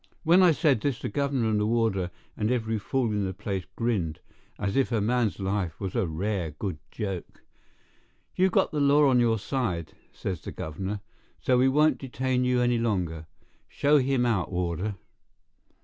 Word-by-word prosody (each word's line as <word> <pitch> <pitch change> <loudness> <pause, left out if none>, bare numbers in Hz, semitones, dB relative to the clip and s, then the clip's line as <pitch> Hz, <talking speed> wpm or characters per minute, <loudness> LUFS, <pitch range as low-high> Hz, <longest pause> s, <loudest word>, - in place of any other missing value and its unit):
When 170 +3 +6
I 180 -2 +7
said 150 -7 +2
this 140 -4 0
the - - -4
governor 140 -5 0
and 105 - +2
the 105 - +1
warder 110 -6 +1 0.3
and 105 0 -1
every 110 -3 0
fool 120 +2 0
in 105 -1 0
the 95 -1 -3
place 95 -2 -3
grinned, 100 -10 -1 0.4
as 100 -1 -2
if 135 -1 +2
a 115 - +2
man's 115 +1 +1
life 95 -4 -2
was 95 -2 -4
a 115 -6 +1
rare 90 +2 -2
good 80 +2 -5
joke. 95 -5 -6 0.9
"You've 185 +1 +3
got - - +2
the 150 - -1
law 145 +1 +5
on 130 -2 +4
your 115 -2 +3
side," 100 - -2 0.2
says 90 -5 -4
the - - -7
governor; 95 +6 -5 0.4
"so 125 -1 +2
we 130 +1 +5
won't 150 +1 +3
detain 130 -1 -1
you 125 0 +2
any 120 -1 +2
longer. 90 -8 -1 0.4
Show 145 +1 +3
him 130 -2 +1
out, 105 -8 0
warder." 90 +3 -2
110 Hz, 180 wpm, -27 LUFS, 95-130 Hz, 0.9 s, I